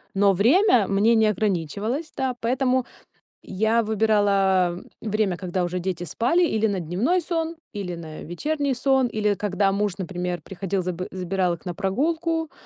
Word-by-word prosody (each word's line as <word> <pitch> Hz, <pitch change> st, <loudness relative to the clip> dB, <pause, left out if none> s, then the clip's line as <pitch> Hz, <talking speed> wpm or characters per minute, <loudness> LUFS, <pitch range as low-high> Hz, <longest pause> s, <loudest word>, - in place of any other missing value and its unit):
но 200 Hz, 0 st, +4 dB
время 240 Hz, -, +4 dB
мне 205 Hz, +4 st, +3 dB
не 220 Hz, -1 st, +4 dB
ограничивалось, 210 Hz, -, -1 dB
да. 260 Hz, -2 st, -1 dB
Поэтому 255 Hz, +1 st, +1 dB, 0.6 s
я 220 Hz, +4 st, +1 dB
выбирала 200 Hz, -4 st, +2 dB, 0.2 s
время, 215 Hz, -4 st, 0 dB
когда 185 Hz, -1 st, -2 dB
уже 175 Hz, +1 st, -2 dB
дети 180 Hz, -1 st, -3 dB
спали: 250 Hz, -, +1 dB
или 220 Hz, -7 st, +1 dB
на 200 Hz, -3 st, -1 dB
дневной 195 Hz, -, +1 dB
сон, 330 Hz, 0 st, -2 dB, 0.2 s
или 195 Hz, -4 st, -4 dB
на 160 Hz, -2 st, -8 dB
вечерний 285 Hz, -, -2 dB
сон, 265 Hz, +1 st, +2 dB
или 210 Hz, -2 st, 0 dB
когда 200 Hz, 0 st, 0 dB
муж, 205 Hz, 0 st, 0 dB
например, 180 Hz, -1 st, -3 dB
приходил, 190 Hz, +2 st, -3 dB
заб 180 Hz, 0 st, -4 dB
забирал 185 Hz, -1 st, -1 dB
их 165 Hz, -, -14 dB
на 175 Hz, -2 st, -4 dB
прогулку, 320 Hz, -, -1 dB
205 Hz, 150 wpm, -24 LUFS, 185-250 Hz, 0.6 s, но